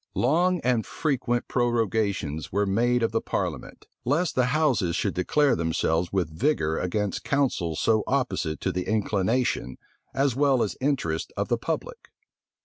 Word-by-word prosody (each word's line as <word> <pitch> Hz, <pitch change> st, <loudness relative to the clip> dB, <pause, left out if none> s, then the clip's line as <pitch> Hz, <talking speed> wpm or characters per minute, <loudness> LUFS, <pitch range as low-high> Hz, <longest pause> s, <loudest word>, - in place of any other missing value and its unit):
} -, -, -56 dB, 0.2 s
Long 180 Hz, +2 st, +2 dB
and 125 Hz, -3 st, +1 dB
frequent 125 Hz, -5 st, -1 dB
prorogations 110 Hz, -, 0 dB
were 100 Hz, +2 st, +1 dB
made 120 Hz, +5 st, +2 dB
of 115 Hz, -, +1 dB
the 115 Hz, -, 0 dB
parliament; -, -, -4 dB, 0.2 s
lest 150 Hz, +7 st, +1 dB
the 125 Hz, -, +2 dB
houses 125 Hz, -, +1 dB
should 100 Hz, -, 0 dB
declare 135 Hz, +9 st, +2 dB
themselves 80 Hz, +1 st, 0 dB
with 90 Hz, -5 st, -1 dB
vigor 80 Hz, -, +1 dB
against 100 Hz, +2 st, -2 dB
counsels 110 Hz, -, 0 dB
so 110 Hz, -2 st, +2 dB
opposite 95 Hz, -, -1 dB
to -, -, 0 dB
the 90 Hz, +1 st, -3 dB
inclination 105 Hz, -, 0 dB, 0.4 s
as 135 Hz, -3 st, +1 dB
well 135 Hz, -3 st, +3 dB
as 105 Hz, -, -3 dB
interests 130 Hz, -, -1 dB
of -, -, -1 dB
the -, -, +2 dB
public. -, -, -4 dB
115 Hz, 150 wpm, -26 LUFS, 90-135 Hz, 0.4 s, well